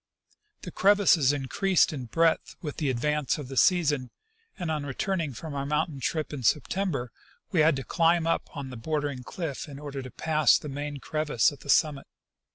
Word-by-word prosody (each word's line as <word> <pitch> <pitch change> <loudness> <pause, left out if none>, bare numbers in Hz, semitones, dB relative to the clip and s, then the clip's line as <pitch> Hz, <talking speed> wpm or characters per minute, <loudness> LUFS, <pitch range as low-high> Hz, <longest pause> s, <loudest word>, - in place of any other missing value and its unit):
The 180 - -6
crevasses 190 -9 +4
increased 160 +6 +1
in 130 -4 -5
breadth 165 +7 +1
with 150 -4 -6
the 150 -4 0
advance 150 +4 0
of 145 -4 -7
the 135 - -6
season, 150 -5 +3 0.5
and 175 -5 -3
on 150 -2 -2
returning 155 +3 -2
from 155 +4 -7
our 140 -1 -2
mountain 150 0 -1
trip 155 +3 -2
in 140 - -5
Septem 165 - +1
ber 125 -7 -3 0.4
we 180 - +1
had 155 0 +5
to 135 - -4
climb 165 +1 +2
up 165 - 0
on 135 -2 -5
the 125 - -7
bordering 145 +1 -2
cliff 150 +1 -5
in 140 - -9
order 140 -1 -6
to 130 - -8
pass 155 +3 +3
the 150 - -7
main 145 +1 -5
crevasse 150 -4 +1
at 145 - -12
the 140 - -13
summit. 140 -1 +2
150 Hz, 190 wpm, -27 LUFS, 135-165 Hz, 0.5 s, had